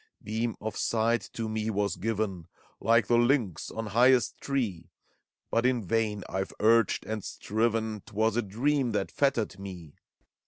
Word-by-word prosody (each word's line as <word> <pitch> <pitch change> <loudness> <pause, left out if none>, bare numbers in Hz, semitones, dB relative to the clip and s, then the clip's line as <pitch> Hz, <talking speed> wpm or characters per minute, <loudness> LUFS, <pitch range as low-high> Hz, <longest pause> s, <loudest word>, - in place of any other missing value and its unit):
Beam 110 +2 -2
of 110 -2 -4
sight 115 0 +1
to 115 -1 -3
me 110 0 -2
was 100 -2 0
given, 100 -5 -2 0.3
Like 115 -1 +4
the 120 +2 +3
lynx 120 - +1
on 115 - -5
highest 120 +3 +4
tree; 105 - -2 0.6
But 115 - +2
in 125 -4 +1
vain 105 0 0
IVe 95 0 -3
urged 115 0 +3
and 110 -2 -4
striven, 110 0 -1
'T - - -13
was 110 0 +2
a 120 - +2
dream 125 +4 0
that 100 -2 -1
fettered 120 -8 0
me. 90 -6 -8
110 Hz, 155 wpm, -29 LUFS, 100-120 Hz, 0.6 s, Like